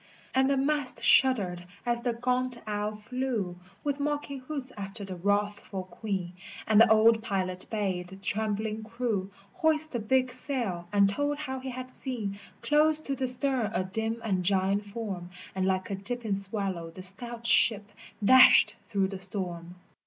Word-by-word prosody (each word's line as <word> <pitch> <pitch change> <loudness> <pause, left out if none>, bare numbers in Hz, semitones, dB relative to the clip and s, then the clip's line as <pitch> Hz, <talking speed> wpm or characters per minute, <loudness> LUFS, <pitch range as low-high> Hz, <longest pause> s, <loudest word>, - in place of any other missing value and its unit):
And 265 +1 +3
the 280 - +2
mast 285 -1 0
shuddered 200 -10 +4 0.2
as 240 0 +1
the 240 0 0
gaunt 250 +1 0
owl 210 0 -2
flew 215 -5 -3 0.3
With 285 -1 -1
mocking 290 -1 -2
hoots 265 0 -6
after 200 +1 -6
the 190 -1 -6
wrathful 205 +1 -1
Queen, 185 -2 -4 0.3
And 215 0 +6
the 230 - +7
old 220 +1 +6
pilot 185 -4 -2
bade 190 -5 -1
the 190 - -10
trembling 215 +2 -2
crew 220 -4 -2 0.2
Hoist 315 -3 +2
the 240 - -2
big 255 +4 +2
sail, 235 -10 -2
and 200 -1 +5
told 285 +8 -1
how 265 -3 -4
he 260 +1 -6
had 255 0 -6
seen 220 -8 -4 0.2
Close 305 +1 +4
to 275 -3 -3
the 265 -1 -1
stern 250 -3 +1
a 185 - +1
dim 220 +4 -2
and 190 -5 0
giant 195 +2 +1
form, 200 -5 -5 0.2
And 190 0 0
like 190 +3 0
a - - 0
dipping 225 +2 -3
swallow 195 -4 -3
the 185 +3 -10
stout 235 +5 -5
ship 220 -3 +3 0.4
dashed 260 +3 +8
through 195 -3 +1
the 195 -1 -6
storm. 180 -2 -5
220 Hz, 165 wpm, -29 LUFS, 195-255 Hz, 0.4 s, dashed